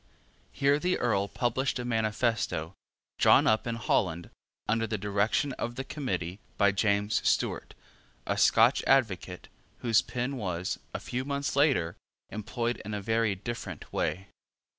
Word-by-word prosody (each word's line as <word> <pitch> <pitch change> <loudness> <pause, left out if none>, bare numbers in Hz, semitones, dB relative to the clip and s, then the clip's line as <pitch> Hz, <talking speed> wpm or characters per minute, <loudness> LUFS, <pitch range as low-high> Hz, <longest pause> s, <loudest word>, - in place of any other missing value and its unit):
Here 140 +1 +2
the 180 +3 +1
Earl 100 -5 +1
published 125 +5 -1
a 125 - -4
manifesto, 110 -7 0 0.5
drawn - - +6
up 110 +2 +2
in 115 - -1
Holland, 90 -6 0 0.4
under 115 +1 +1
the 110 0 -2
direction 105 +7 0
of 120 +1 -3
the 135 - -3
Committee, 120 - -3 0.2
by 100 -1 +4
James 100 +1 +1
Stewart, - - 0 0.5
a - - 0
Scotch - - +5
advocate, 95 -8 +1 0.3
whose 115 -2 +4
pen 125 +2 -3
was, 90 -5 -3 0.2
a - - -1
few 125 +1 -3
months 140 0 -2
later, 135 - +2 0.3
employed 115 +3 -3
in 105 +1 -4
a - - -2
very 110 -1 +1
different 120 +5 -7
way. 95 +2 -2
115 Hz, 140 wpm, -29 LUFS, 100-125 Hz, 0.5 s, drawn